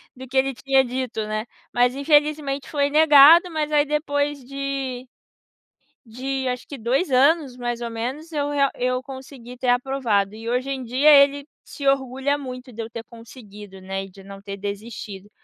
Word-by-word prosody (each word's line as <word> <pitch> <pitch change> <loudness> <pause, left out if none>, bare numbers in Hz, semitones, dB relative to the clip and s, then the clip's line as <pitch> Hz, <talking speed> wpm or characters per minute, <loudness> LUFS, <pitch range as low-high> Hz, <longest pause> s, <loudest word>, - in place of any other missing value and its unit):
do 260 +1 -10
que 265 +1 -4
ele 270 +1 +2
tinha 270 +1 +2
dito, 245 -3 -4
né, 215 +1 -3 0.3
mas 245 0 +3
infelizmente 290 -1 +1
foi 285 -2 0
negado, 310 +3 +7
mas 310 -2 -2
aí 295 0 +3
depois 290 -1 -1
de 275 -2 -4 1.0
de 260 +3 -3
acho 250 0 -4
que 285 - -7
2 260 +8 0
anos, 280 0 +3
mais 240 -1 -4
ou 235 - -3
menos, 260 +9 -5
eu 290 -1 -1
real 280 -2 +2
eu 255 0 -1
consegui 260 -2 -10
ter 250 0 -4
aprovado 245 -5 +1
e 225 +1 -8
hoje 255 +3 -1
em 270 -1 -3
dia 255 +6 +2
ele 280 0 +5 0.2
se 280 - -8
orgulha 270 +1 0
muito 255 -2 -8
de 230 - -6
eu 225 - -8
ter 230 -1 -7
conseguido, 210 -5 -13
né, 195 +1 -5
e 195 - -13
de 195 +1 -16
não 195 0 -11
ter 200 0 -7
desistido. 205 0 -7
260 Hz, 180 wpm, -22 LUFS, 235-280 Hz, 1.0 s, negado